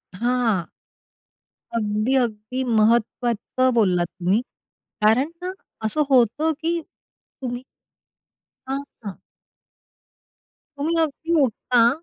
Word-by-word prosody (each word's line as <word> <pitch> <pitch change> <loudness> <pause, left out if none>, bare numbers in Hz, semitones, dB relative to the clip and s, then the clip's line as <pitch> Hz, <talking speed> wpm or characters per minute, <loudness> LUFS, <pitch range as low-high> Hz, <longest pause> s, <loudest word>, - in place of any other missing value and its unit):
हां. 235 -5 +1 1.1
अगदी, 215 +4 0
अगदी 240 +1 -1
महत्त्वाचं 235 +2 +2
बोललात 185 -6 +3
तुम्ही. 190 +6 +2 0.6
कारण 235 +8 +4
ना 365 +1 -3 0.3
असं 300 +8 +2
होतं 265 +5 +3
की 335 +1 0
तुम्ही 250 -4 -9 1.0
हां, 270 +1 -1 0.2
हां. 200 -2 -7 1.6
तुम्ही 320 +4 0
अगदी 320 +2 -1
उठता, 235 -1 +3
240 Hz, 85 wpm, -23 LUFS, 215-270 Hz, 1.6 s, कारण